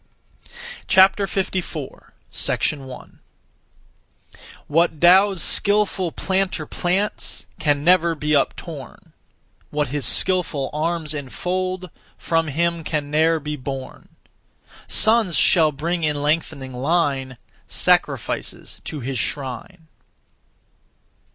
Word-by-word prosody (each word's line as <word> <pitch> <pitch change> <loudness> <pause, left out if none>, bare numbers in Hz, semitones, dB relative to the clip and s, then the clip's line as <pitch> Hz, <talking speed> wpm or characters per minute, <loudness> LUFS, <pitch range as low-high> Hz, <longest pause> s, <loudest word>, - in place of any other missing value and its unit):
54. 190 -5 +1 0.2
1. 135 -3 -3 1.5
What 165 0 +1
(Tao's) 190 +2 +5
skilful 205 -4 +1
planter 190 -4 -1
plants 185 +7 -2
Can 145 -2 +1
never 170 -1 +4
be 150 0 -3
uptorn; 140 -1 -3 0.6
What 150 -2 -1
his 145 +1 -2
skilful 175 -7 +1
arms 160 0 -1
enfold, 185 +6 -3 0.3
From 165 -1 0
him 170 +3 -1
can 150 -2 -3
ne'er 160 +2 +3
be 150 0 -4
borne. 135 -1 -7 0.8
Sons 220 -6 +4
shall 160 -1 +4
bring 165 +5 -2
in 150 -2 0
lengthening 145 -3 -1
line, 135 -2 0 0.3
Sacrifices - - -1
to 150 -3 -5
his 130 +1 -3
shrine. 145 - -4
160 Hz, 90 wpm, -21 LUFS, 145-180 Hz, 1.5 s, Tao's